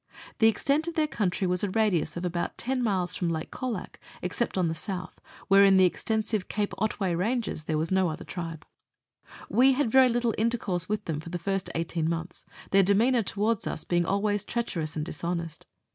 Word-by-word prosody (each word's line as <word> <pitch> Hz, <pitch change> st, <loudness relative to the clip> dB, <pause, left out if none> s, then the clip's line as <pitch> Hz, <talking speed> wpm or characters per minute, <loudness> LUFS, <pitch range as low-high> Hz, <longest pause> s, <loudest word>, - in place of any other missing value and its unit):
The 225 Hz, -, +6 dB
extent 280 Hz, -, +1 dB
of 340 Hz, -, -4 dB
their 315 Hz, -, +3 dB
country 200 Hz, -9 st, -1 dB
was 180 Hz, +1 st, 0 dB
a 205 Hz, -, +1 dB
radius 205 Hz, -5 st, +1 dB
of 175 Hz, -, -3 dB
about 175 Hz, -1 st, -2 dB
10 255 Hz, +1 st, -1 dB
miles 190 Hz, -6 st, 0 dB
from 175 Hz, -, -1 dB
Lake 160 Hz, -1 st, -3 dB
Colac 245 Hz, -7 st, -5 dB, 0.2 s
exce*pt 185 Hz, +4 st, -2 dB
on 180 Hz, -2 st, +2 dB
the 160 Hz, -, -1 dB
south, 180 Hz, +2 st, -5 dB, 0.3 s
where 195 Hz, +1 st, +7 dB
in 195 Hz, -1 st, +6 dB
the 190 Hz, -, +6 dB
extensive 215 Hz, +2 st, -1 dB
Cape 210 Hz, -1 st, -2 dB
Otway 195 Hz, -3 st, 0 dB
Ranges 205 Hz, -2 st, -1 dB
there 155 Hz, -1 st, 0 dB
was 160 Hz, +3 st, -1 dB
no 190 Hz, -2 st, +3 dB
other 160 Hz, +2 st, -6 dB
tribe. 165 Hz, -3 st, -6 dB, 0.8 s
We 265 Hz, +3 st, +5 dB
had 255 Hz, -4 st, 0 dB
very 260 Hz, 0 st, +6 dB
little 240 Hz, -1 st, +1 dB
intercourse 215 Hz, -6 st, 0 dB
with 210 Hz, 0 st, -2 dB
them 155 Hz, -3 st, -2 dB
for 160 Hz, -, -9 dB
the 175 Hz, -, -3 dB
first 195 Hz, +2 st, -2 dB
eighteen 165 Hz, -1 st, -1 dB
months, 170 Hz, +1 st, -4 dB, 0.3 s
their 195 Hz, -, +6 dB
demeanour 225 Hz, +6 st, +3 dB
towards 210 Hz, +2 st, -1 dB
us -, -, -2 dB
being 175 Hz, -1 st, 0 dB
always 205 Hz, 0 st, +1 dB
treacherous 180 Hz, -10 st, -3 dB
and 150 Hz, -1 st, -2 dB
dishonest. 170 Hz, -1 st, -4 dB
195 Hz, 195 wpm, -27 LUFS, 175-225 Hz, 0.8 s, where